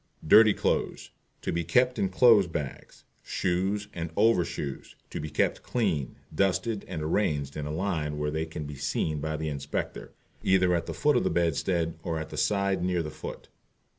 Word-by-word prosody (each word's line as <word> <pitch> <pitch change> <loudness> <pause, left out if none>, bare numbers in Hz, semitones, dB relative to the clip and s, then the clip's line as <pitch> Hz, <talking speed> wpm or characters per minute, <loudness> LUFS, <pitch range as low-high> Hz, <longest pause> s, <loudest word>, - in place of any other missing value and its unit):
Dirty 110 +6 +7
Clothes - - -1 0.3
To - - -1
be 85 0 -1
kept 125 +9 +2
in 95 -2 +1
clothes 105 -1 +6
bag. 75 -5 -5 0.3
Shoes 95 +3 -1
and 85 -1 -4
Over 110 -3 +4
Shoes 70 -4 -6 0.2
To - - -4
be 75 - -4
kept - - 0
clean, 90 - -1 0.2
dusted, 100 +5 0
and 75 - -4
arranged 75 -5 0
in 75 -1 -4
a - - -4
line 80 -4 -2
where 75 0 -1
they 80 +1 -2
can 80 -1 -6
be 75 -1 -7
seen 75 +2 -1
by 80 +1 -2
the 80 0 -2
Inspector, 70 0 -4 0.3
either 95 -1 +3
at 85 -1 -1
the - - -4
foot 150 0 +3
of - - +1
the - - +1
bedstead 85 0 0
or 80 -1 -2
at 80 0 -5
the - - -8
side 100 -2 +1
near 90 -2 +1
the 75 - -5
foot. 75 - -8
85 Hz, 190 wpm, -28 LUFS, 75-95 Hz, 0.3 s, Dirty